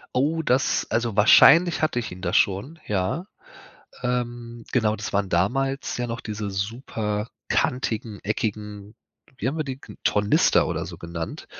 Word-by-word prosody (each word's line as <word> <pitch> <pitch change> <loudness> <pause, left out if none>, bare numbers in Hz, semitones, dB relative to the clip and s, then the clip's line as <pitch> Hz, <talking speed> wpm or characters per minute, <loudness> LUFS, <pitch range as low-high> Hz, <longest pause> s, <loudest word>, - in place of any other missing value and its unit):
Oh, 155 +5 +1
das 130 -3 +1
also, 115 -1 0
wahrscheinlich 160 - +7
hatte 155 -6 +1
ich 115 - -6
ihn 90 0 -9
da 85 -2 -1
schon, 105 - +1
ja. 100 - -1 0.8
Ähm. 120 -1 -3
Genau, 110 -4 +2
das 105 - -5
waren 100 -1 +1
damals 135 +10 0
ja 120 0 -2
noch 115 +1 -4
diese 105 -1 -5
super 105 +1 -3 0.2
kantigen, 110 -4 -1
eckigen, 105 0 -4 0.4
wie - - -1
haben 145 - -2
wir 155 - -1
die 135 -1 -6
ge - - -12
Tornister 105 0 +3
oder - - -2
so - - -9
genannt, 85 -1 -6
115 Hz, 155 wpm, -24 LUFS, 105-130 Hz, 0.8 s, wahrscheinlich